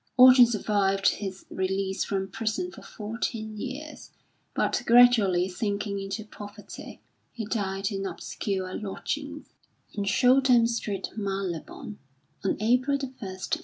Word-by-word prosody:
Orton 255 Hz, -1 st, +9 dB
survived 200 Hz, -3 st, +1 dB
his 195 Hz, -2 st, -5 dB
release 190 Hz, 0 st, -1 dB
from 195 Hz, -1 st, -2 dB
prison 225 Hz, -, -2 dB
for -, -, -12 dB
fourteen 220 Hz, 0 st, -4 dB
years, 275 Hz, +7 st, -7 dB, 0.5 s
but -, -, +1 dB
gradually 230 Hz, -7 st, +6 dB
sinking 200 Hz, +1 st, -2 dB
into 195 Hz, +2 st, -5 dB
poverty, 205 Hz, 0 st, -10 dB, 0.3 s
he 225 Hz, -, -5 dB
died 195 Hz, -2 st, -2 dB
in 195 Hz, -1 st, -2 dB
obscure 190 Hz, -2 st, -4 dB
lodgings 285 Hz, +8 st, -5 dB, 0.5 s
in 205 Hz, -1 st, -2 dB
Shouldham 250 Hz, +2 st, +5 dB
Street, 210 Hz, -4 st, -3 dB
Marylebone, 195 Hz, -1 st, -4 dB, 0.4 s
on 195 Hz, -, +2 dB
April 250 Hz, +6 st, +2 dB
1, 275 Hz, -2 st, -4 dB
1898. 190 Hz, +8 st, -3 dB
210 Hz, 120 wpm, -27 LUFS, 195-240 Hz, 0.5 s, Orton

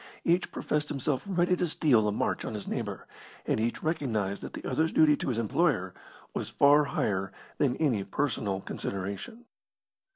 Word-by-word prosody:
Each 175 Hz, +2 st, +2 dB
professed 150 Hz, 0 st, -1 dB
himself 140 Hz, -1 st, -1 dB
ready 180 Hz, -1 st, +2 dB
to 180 Hz, 0 st, 0 dB
steal 130 Hz, -9 st, +3 dB
a -, -, +2 dB
march 105 Hz, -, -1 dB
on 110 Hz, -, -4 dB
his 105 Hz, -, -6 dB
neighbour, -, -, -4 dB, 0.4 s
and -, -, +1 dB
each 115 Hz, +2 st, -1 dB
recognised 110 Hz, -, -1 dB
that -, -, -7 dB
the -, -, -7 dB
other's 160 Hz, +1 st, +1 dB
duty 155 Hz, -2 st, +5 dB
to -, -, -4 dB
his 120 Hz, -, -1 dB
employer 115 Hz, -, +1 dB, 0.4 s
was -, -, -3 dB
far 145 Hz, +1 st, +5 dB
higher 95 Hz, -8 st, -1 dB, 0.3 s
than 130 Hz, -3 st, +2 dB
any 125 Hz, -11 st, +1 dB
personal 105 Hz, -7 st, -1 dB
consideration. 100 Hz, -, -5 dB
135 Hz, 165 wpm, -29 LUFS, 105-155 Hz, 0.4 s, duty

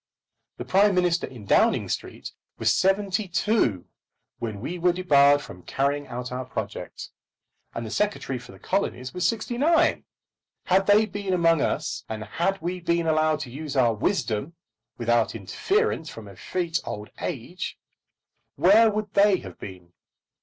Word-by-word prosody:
The -, -, -6 dB
Prime 200 Hz, +1 st, +4 dB
Minister 175 Hz, -1 st, +1 dB
in 120 Hz, -6 st, -11 dB
Downing -, -, +3 dB
Street -, -, -5 dB, 0.3 s
was -, -, +2 dB
seventy 195 Hz, +1 st, +1 dB
two 170 Hz, -, +1 dB, 0.5 s
when 110 Hz, -3 st, -4 dB
we 175 Hz, -, -5 dB
were 175 Hz, +1 st, +3 dB
debarred 145 Hz, -5 st, +4 dB
from 90 Hz, -, -11 dB
carrying 140 Hz, +7 st, -1 dB
out 125 Hz, +1 st, -6 dB
our 125 Hz, +1 st, -3 dB
project, 130 Hz, -, -6 dB, 0.6 s
and 115 Hz, -, -4 dB
the 110 Hz, -, -6 dB
Secretary 200 Hz, -, -1 dB
for 125 Hz, +1 st, -13 dB
the -, -, -14 dB
Colonies 130 Hz, -9 st, -2 dB
was 180 Hz, 0 st, +1 dB
sixty 235 Hz, +1 st, -2 dB
nine. 330 Hz, +3 st, +3 dB, 0.6 s
Had 190 Hz, +1 st, +2 dB
they 210 Hz, +2 st, +6 dB
been 200 Hz, -2 st, -3 dB
among 165 Hz, -3 st, +3 dB
us, -, -, -2 dB
and 110 Hz, -1 st, -4 dB
had 175 Hz, -, -1 dB
we 180 Hz, +2 st, -3 dB
been 170 Hz, -1 st, 0 dB
allowed 155 Hz, -1 st, +2 dB
to 125 Hz, -, -6 dB
use 145 Hz, +2 st, -6 dB
our 120 Hz, -3 st, +4 dB
wisdom 120 Hz, -, -1 dB, 0.4 s
without 120 Hz, -1 st, +1 dB
interference 160 Hz, -, -1 dB
from 110 Hz, -2 st, -10 dB
effete 165 Hz, -, -3 dB
old 105 Hz, 0 st, -6 dB
age, -, -, -5 dB, 0.8 s
where 205 Hz, +9 st, +6 dB
would 210 Hz, -1 st, -3 dB
they 200 Hz, -1 st, +5 dB
have -, -, -11 dB
been? 90 Hz, -3 st, -10 dB
165 Hz, 155 wpm, -25 LUFS, 120-195 Hz, 0.8 s, they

